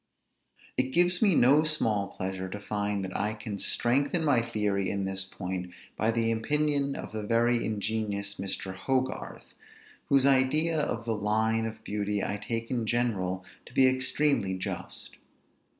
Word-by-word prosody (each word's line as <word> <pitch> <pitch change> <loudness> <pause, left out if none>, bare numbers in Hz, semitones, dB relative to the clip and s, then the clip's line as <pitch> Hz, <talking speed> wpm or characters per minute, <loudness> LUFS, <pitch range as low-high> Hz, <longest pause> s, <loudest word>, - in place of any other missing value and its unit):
It 130 +1 0
gives 175 +1 +3
me 200 -6 +4
no 140 +5 +5
small 110 -10 +1
pleasure 95 0 -4
to 105 - -6
find 105 -1 -2
that 95 - -7
I 105 +1 0
can 105 -2 -6
strengthen 140 - +1
my 135 -6 +4
theory 105 -4 -1
in 100 -1 -1
this 95 0 +2
point 90 -1 -5 0.2
by 110 - +1
the 115 0 +2
opinion 140 +4 +1
of - - -6
the 110 0 -4
very 115 +2 +2
ingenious 105 -1 -2
Mr. 95 0 -4
Hogarth, 130 +6 -3 0.6
whose 135 -1 +5
idea 145 +4 +3
of 115 -5 -2
the 115 - 0
line 110 +2 +1
of 110 0 -9
beauty 105 0 -2
I 100 - -1
take 115 0 -3
in 120 -3 -1
general 95 -6 -1 0.2
to - - -14
be 135 - +6
extremely 130 -6 +1
just. 95 - -5
110 Hz, 155 wpm, -28 LUFS, 100-130 Hz, 0.6 s, be